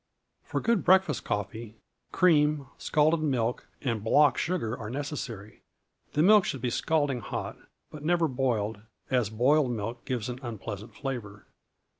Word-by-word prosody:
For - - -3
good 230 -5 +1
breakfast 185 -6 +4
coffee, 105 +2 -4 0.4
cream, 150 -4 +3
scalded 155 +2 +2
milk, 125 -6 -1 0.2
and 115 -6 -1
block 140 +4 +5
sugar 165 -11 -1
are 110 -3 -7
necessary. 130 -6 -6 0.5
The 150 - +3
milk 210 +2 +7
should 135 - -3
be 125 - -1
scalding 145 -2 0
hot, - - -5 0.4
but 150 -1 -9
never 170 +1 +2
boiled, 115 -6 -1 0.3
as 125 -5 +2
boiled 130 +5 +3
milk 115 +1 -4
gives 120 -5 -2
an 125 0 -5
unpleasant 110 -3 -7
flavor. 115 -8 -6
130 Hz, 140 wpm, -28 LUFS, 115-150 Hz, 0.5 s, milk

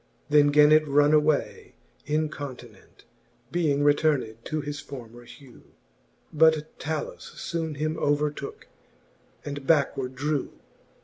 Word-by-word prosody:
Then 150 -1 +5
gan 150 +1 +5
it 155 0 +5
runne 145 +1 +4
away 150 -1 0 0.3
incontinent, 145 -8 -5 0.5
Being 150 -5 +1
returned 145 -6 +2
to 155 - -2
his 145 0 -5
former 120 -3 -10
hew: 130 0 -15 0.7
But 160 0 +2
Talus 155 -1 -5
foone 160 -2 -4
him 155 +2 -2
overtooke, 145 -1 -2 0.8
and 145 -2 -6
backward 135 -4 +1
drew. 145 +1 -2
145 Hz, 110 wpm, -26 LUFS, 140-155 Hz, 0.8 s, Then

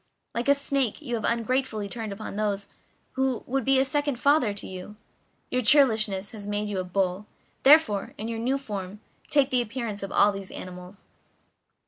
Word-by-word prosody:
Like 235 +2 -2
a 280 - +6
snake, 275 -4 0
you 245 -4 -4
have 225 -2 -1
ungratefully 235 -2 0
turned 220 0 -5
upon 200 0 -6
one 210 -1 0 0.5
who 265 -2 -1
was 270 +2 -1
a 270 -1 +5
second 285 -1 -1
father 280 -6 +3
to 200 - -7
you; 185 +3 -8 0.6
your 255 - +1
churlishness 220 -6 +4
has 205 -2 -8
made 205 0 -1
you 205 -2 -3
like 185 -1 -3
a - - -15
bull. 190 +2 -1 0.3
Therefore, 270 -9 +5
in 220 - -5
your 230 -1 -3
new 255 +4 +1
form, 205 -6 -6 0.3
take 280 -2 +3
the 250 -1 +3
appearance 230 -3 -4
of 195 - -5
all 205 - +5
these 195 -1 -7
animals." 180 +2 -9
220 Hz, 180 wpm, -26 LUFS, 200-265 Hz, 0.6 s, a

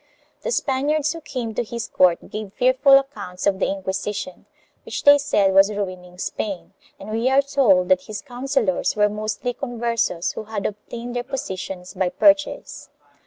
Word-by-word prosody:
The - - -3
Spaniards 295 - 0
who 330 - -8
came 240 -6 -5
to 245 - -1
his 235 0 -5
court 180 -2 +2
gave 210 -2 -6
fearful 260 +2 +5
accounts 270 -10 -4
of 195 -1 +2
the - - +1
Inquisition, 190 0 -4 0.4
which - - -5
they 285 0 +8
said 205 -9 +2
was 195 +2 +6
ruining 185 -3 -5
Spain, 195 0 -4 0.3
and 205 +2 -8
we 225 +3 +1
are 270 +1 +4
told 230 -11 +3
that 185 -1 +4
his 210 -1 -7
counsellors 250 -6 -1
were 210 0 +3
mostly 215 +3 -3
Converses 235 -8 -1
who 215 - -7
had 210 -2 -5
obtained 235 +4 -5
their 245 - 0
positions 190 -8 -6
by 185 -2 0
purchase. 295 +7 +1
215 Hz, 165 wpm, -22 LUFS, 195-265 Hz, 0.4 s, they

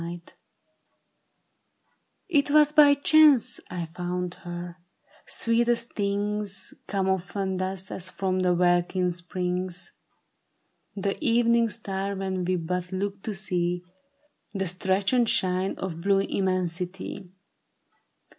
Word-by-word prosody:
It 290 -6 +2
was 300 0 +5
by 295 -2 +7
chance 295 -3 +5
I 175 -1 -4
found 180 +1 -4
her; 175 0 -7 0.5
sweetest 235 +1 +1
things 205 0 -2
Come 195 -2 -1
often 190 0 -1
thus, 185 0 -4
as 185 -1 -3
from 185 -1 -1
the 180 -1 +2
welkin 175 +1 +2
springs 180 +1 -3 1.0
The 200 +7 -2
evening 235 -2 +3
star 200 -2 -3
when 190 -1 -2
we 185 +1 +1
but 180 +1 -3
look 195 +1 -3
to 215 0 -4
see 180 -2 -1 0.7
The 195 0 -1
stretch 190 +4 0
and 240 -3 +3
shine 185 +1 +1
of 170 -3 -5
blue 195 +1 +3
immensity. 185 0 -2
190 Hz, 110 wpm, -26 LUFS, 180-205 Hz, 1.0 s, by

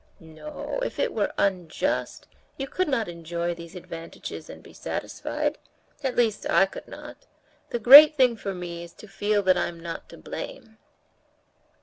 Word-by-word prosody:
"No, 165 - -7
if - - -4
it - - 0
were 210 -2 0
unjust, 180 -5 -1 0.3
you 270 - -3
could 370 +6 -1
not 250 -6 0
enjoy 170 0 -3
these 170 +1 -11
advantages 165 -2 -8
and - - -11
be - - -15
satisfied—at 265 -3 -5
least 225 -3 +1
I 195 - +5
could 195 - -10
not. - - -11 0.4
The - - -1
great 285 +7 +10
thing 250 -3 +4
for 195 -3 -5
me 170 -1 -6
is 170 - -12
to 215 - -14
feel 205 +1 0
that 185 -1 +4
I'm 170 -1 -3
not 165 0 -7
to - - -12
blame." 225 - -8
195 Hz, 155 wpm, -26 LUFS, 170-240 Hz, 0.4 s, great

